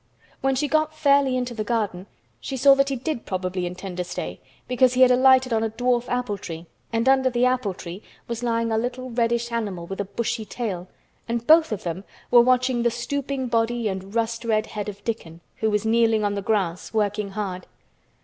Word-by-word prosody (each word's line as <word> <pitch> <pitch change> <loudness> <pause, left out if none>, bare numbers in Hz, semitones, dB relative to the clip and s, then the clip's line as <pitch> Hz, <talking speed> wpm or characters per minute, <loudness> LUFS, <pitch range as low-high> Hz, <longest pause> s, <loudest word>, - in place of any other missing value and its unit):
When 270 0 +1
she 295 +3 0
got 310 +2 +1
fairly 280 -3 +3
into 245 -1 -2
the 220 -2 -3
garden 205 -5 -2 0.3
she 265 - -5
saw 275 +2 +7
that 275 0 +2
he 270 - -2
probably 190 - -3
did 180 - -1
intend 180 +1 -7
to 180 - 0
stay 175 - -6 0.3
because 250 0 +3
he 255 - +2
had 250 - +6
alighted 260 0 +5
on 220 - +2
a 225 - 0
dwarf 245 +2 0
apple 245 -5 -1
tree 165 -1 -7 0.3
and 230 +2 0
under 265 -1 +4
the 245 0 +2
apple 250 -7 0
tree 175 +3 -8 0.3
was 235 0 -4
lying 230 -1 0
a 220 - +2
little 250 +2 -4
reddish 235 0 0
animal 205 -7 -3
with 195 +3 -4
a - - -3
Bushy 225 +3 -3
tail, 195 -5 -4 0.4
and 235 0 -2
both 320 -1 +6
of 210 - -3
them 175 +2 -4 0.3
were 240 - +8
watching 255 0 +2
the 235 - +3
stooping 265 +3 -3
body 230 0 0
and 190 +1 -5
rust 230 0 -1
red 220 -2 +1
head 210 -1 -5
of 200 0 -10
Dickon, 170 -8 -5 0.2
who 220 - +1
was 210 0 0
kneeling 225 -1 +3
on 205 0 +1
the 200 - -2
grass 190 -4 -1
working 210 -1 0
hard. 190 -3 -4
230 Hz, 205 wpm, -24 LUFS, 205-250 Hz, 0.4 s, were